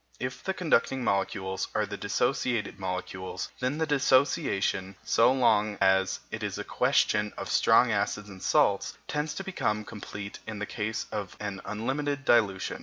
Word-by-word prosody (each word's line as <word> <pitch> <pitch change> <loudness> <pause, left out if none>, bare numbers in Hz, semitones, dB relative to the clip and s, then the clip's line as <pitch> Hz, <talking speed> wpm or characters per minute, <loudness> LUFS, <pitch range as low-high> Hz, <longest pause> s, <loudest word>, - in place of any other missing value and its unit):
If 125 +1 -4
the 190 - -2
conducting 135 -7 +1
molecules 95 -2 -1
are 105 - +2
the 100 0 -6
dissociated 120 +4 -1
molecules, 95 0 -4
then 130 +3 -1
the 160 - +1
dissociation 130 - +2
(so 115 +2 +4
long 110 -5 +3
as 95 0 +3
it - - -5
is - - -3
a - - -3
question 105 -1 +2
of - - -5
strong - - +5
acids 105 0 -1
and 95 -2 -11
salts) - - +2
tends 150 +1 -2
to 195 - -4
become 110 - -1
complete 105 -1 -7
in 110 -1 -5
the 105 - -3
case 110 0 -3
of 105 -3 -5
an 100 -2 -4
unlimited 140 +6 -2
dilution. 100 -5 +2
105 Hz, 160 wpm, -28 LUFS, 100-130 Hz, -, strong